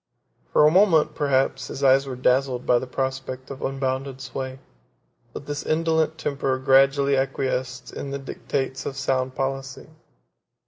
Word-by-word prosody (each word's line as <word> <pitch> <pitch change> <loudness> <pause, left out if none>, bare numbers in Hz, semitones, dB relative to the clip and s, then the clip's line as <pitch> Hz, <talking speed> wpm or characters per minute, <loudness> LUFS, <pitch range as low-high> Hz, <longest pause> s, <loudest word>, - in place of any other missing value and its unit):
For 150 - +5
a 150 - +6
moment, 165 -5 +4
perhaps, 140 -3 0
his 140 - -6
eyes 135 +1 +5
were 130 - -4
dazzled 125 0 +1
by 120 - +4
the 130 - -6
prospect 130 0 -4
of 135 - -8
unbounded 135 0 -2
sway; 130 +1 -5 0.7
but 140 - -8
his 145 0 -3
indolent 160 0 +1
temper 135 -3 -1
gradually 135 +1 +4
acquiesced 130 -1 -2
in 140 - -5
the 140 - -3
dictates 135 -1 -4
of 135 - -5
sound 130 -1 -1
policy. 135 +1 -4
135 Hz, 145 wpm, -24 LUFS, 130-140 Hz, 0.7 s, a